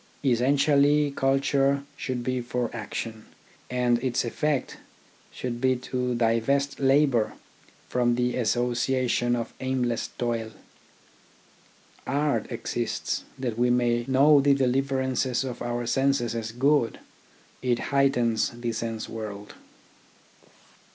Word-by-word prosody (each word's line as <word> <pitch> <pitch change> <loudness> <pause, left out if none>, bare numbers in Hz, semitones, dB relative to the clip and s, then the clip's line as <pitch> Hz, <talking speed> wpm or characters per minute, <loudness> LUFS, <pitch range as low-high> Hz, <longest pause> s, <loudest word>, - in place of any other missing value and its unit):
Essentially 140 +3 +3
culture 135 +1 +1
should 125 -2 -4
be 130 0 -1
for 120 -1 -2
action, 110 0 -5 0.4
and 125 -1 +1
its 125 -1 0
effect 145 +3 -1 0.5
should 120 -1 -5
be 130 -1 +3
to 125 0 -2
divest 120 +5 +1
labour 135 -4 +3 0.5
from 120 -1 +1
the 125 0 0
associations 120 +1 +1
of 115 -1 -4
aimless 125 -3 -1
toil. 115 -2 -2 1.5
Art 145 +1 0
exists 115 0 -3
that 120 -3 -3
we 125 0 +3
may 120 -1 +2
know 140 +2 +5
the 140 0 +4
deliver 135 +1 +1
ances 130 0 0
of 125 - -6
our 120 0 -2
senses 135 -1 +1
as 110 -1 -4
good. 130 0 +2 0.6
It 125 -2 +1 0.2
heightens 120 -4 +2
the 120 -1 -2
sense 115 0 -4
world. 105 -2 -7
125 Hz, 110 wpm, -26 LUFS, 120-135 Hz, 1.5 s, know